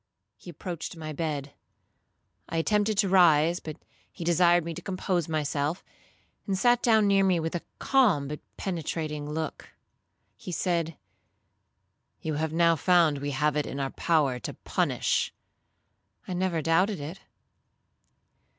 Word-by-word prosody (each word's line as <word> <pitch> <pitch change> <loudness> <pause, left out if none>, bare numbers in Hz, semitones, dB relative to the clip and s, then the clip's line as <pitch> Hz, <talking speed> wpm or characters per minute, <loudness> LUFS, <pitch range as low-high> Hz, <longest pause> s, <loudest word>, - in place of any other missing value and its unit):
He - - -13
approached 175 -1 -6
my 155 -1 -6
bed. 145 -2 -3 1.0
I 165 - -2
attempted 210 +4 +1
to 200 -1 +3
rise, 170 -2 +5
but 155 -2 -8 0.3
he - - -8
desired 175 0 +4
me 170 - -4
to 180 - -8
compose 185 -2 -2
myself, 150 +1 -1 0.6
and 195 -1 0
sat 240 +4 +3
down 220 -3 +4
near 200 -1 +4
me 185 -3 +3
with 160 0 -3
a 175 - -2 0.2
calm 210 - +3
but 150 +1 -5 0.2
penetrating 155 -4 -3
look. 155 0 -5 0.7
He - - -8
said, 170 -3 -1 1.2
'You 155 - -3
have 155 +1 -1
now 165 0 +4
found 165 -3 +3
we 145 +1 -3
have 150 +1 0
it 150 - 0
in 140 - -5
our 135 -1 -2
power 145 -7 +1
to - - -6
punish.'—'I 185 - -4
never 175 -3 -1
doubted 180 +4 +2
it.' 155 +7 -7
165 Hz, 140 wpm, -27 LUFS, 150-185 Hz, 1.2 s, rise